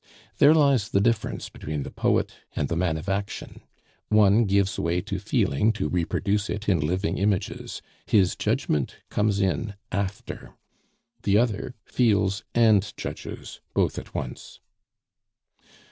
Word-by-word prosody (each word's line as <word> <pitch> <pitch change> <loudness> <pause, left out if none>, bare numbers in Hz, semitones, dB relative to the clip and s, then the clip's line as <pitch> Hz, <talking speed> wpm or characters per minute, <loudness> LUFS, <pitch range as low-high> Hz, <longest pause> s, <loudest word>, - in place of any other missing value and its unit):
There 150 +3 +7
lies 140 -8 +3
the 100 - +2
difference 110 +1 0
between 75 -2 -5
the - - -7
poet - - +1 0.2
and 70 - -1
the 85 - -1
man 85 -2 0
of 80 - -8
action; 100 +1 -4 0.5
one 105 +1 +5
gives 100 0 +1
way 85 +1 +1
to - - -4
feeling 70 +12 +2
to 105 - -2
reproduce 100 +5 0
it 105 +1 -4
in 95 -5 +3
living 90 +7 -1
images, 100 -1 -1 0.2
his 95 -4 +3
judgement 70 -3 0 0.2
comes 105 -1 +1
in 100 +2 -1 0.2
after; 100 -1 -4 0.7
the 100 0 +3
other 115 +1 0
feels 100 -5 +1
and 110 -3 +4
judges - - -7
both - - +1
at - - -13
once. - - -6
100 Hz, 135 wpm, -25 LUFS, 90-110 Hz, 0.7 s, There